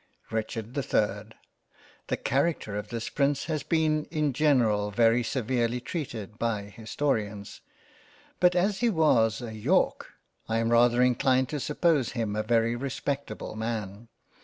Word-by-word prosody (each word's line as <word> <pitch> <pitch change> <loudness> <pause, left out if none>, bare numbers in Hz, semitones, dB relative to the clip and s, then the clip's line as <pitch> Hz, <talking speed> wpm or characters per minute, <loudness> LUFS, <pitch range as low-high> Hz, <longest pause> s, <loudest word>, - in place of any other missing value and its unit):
RICHARD 110 +1 -3
the 140 - -1
3rd 105 -2 -1 0.7
THE - - -1
Character 135 -6 0
of 105 - -4
this 115 -1 -4
Prince 140 0 0
has 155 -2 -2
been 155 0 +1
in 150 -4 -1
general 120 -8 +2
very 115 +3 +3
severely 120 0 -1
treated 120 - -6
by 115 -3 -1
Historians, 105 -1 -3 0.8
but 180 0 +4
as 195 +3 +1
he 240 - +2
was 130 - +2
a 115 -2 -6
York, 110 -1 0 0.4
I 115 - +1
am 115 0 +1
rather 120 +1 +5
inclined 125 +1 +2
to 150 - -3
suppose 150 -3 +1
him 110 -4 -2
a 110 - 0
very 115 +1 +1
respectable 135 -3 -4
Man. 110 -1 -4
120 Hz, 140 wpm, -27 LUFS, 110-140 Hz, 0.8 s, rather